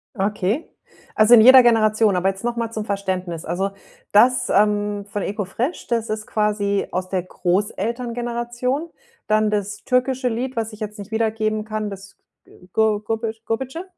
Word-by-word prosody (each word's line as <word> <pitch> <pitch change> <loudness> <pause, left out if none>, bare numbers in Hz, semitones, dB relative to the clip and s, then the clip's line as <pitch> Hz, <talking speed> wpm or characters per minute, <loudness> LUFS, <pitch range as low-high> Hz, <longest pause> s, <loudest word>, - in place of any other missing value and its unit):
Okay. 205 - -1 0.5
Also 215 +3 +7
in 225 - +8
jeder 255 +3 +9
Generation. 215 -3 +3
Aber 185 +2 +2
jetzt 195 +3 -6
noch 240 0 -1
mal 230 -1 -3
zum 215 -2 -4
Verständnis. 185 -5 -3
Also, 185 +4 -1 0.4
das, 250 +4 +4
ähm, 205 0 +1
von 205 -1 -4
Eko 205 0 -3
Fresh, 245 - -3
das 230 -2 -1
ist 215 0 -3
quasi 205 -2 0
aus 185 0 -3
der 185 -2 -1
Großelterngeneration? 240 - -2 0.4
Dann 215 0 +2
das 205 0 -3
türkische 255 0 +1
Lied, 250 +3 -3
was 225 -1 -3
ich 215 - -11
jetzt 210 0 -6
nicht 205 +1 -9
wiedergeben 220 -1 0
kann, 215 -1 -4
das 195 0 -11 0.3
G - - -22 0.2
Gor 215 -1 +2
Gorbe 225 +1 -2 0.2
Gorbetçi, 265 +9 -3
215 Hz, 165 wpm, -21 LUFS, 205-235 Hz, 0.5 s, jeder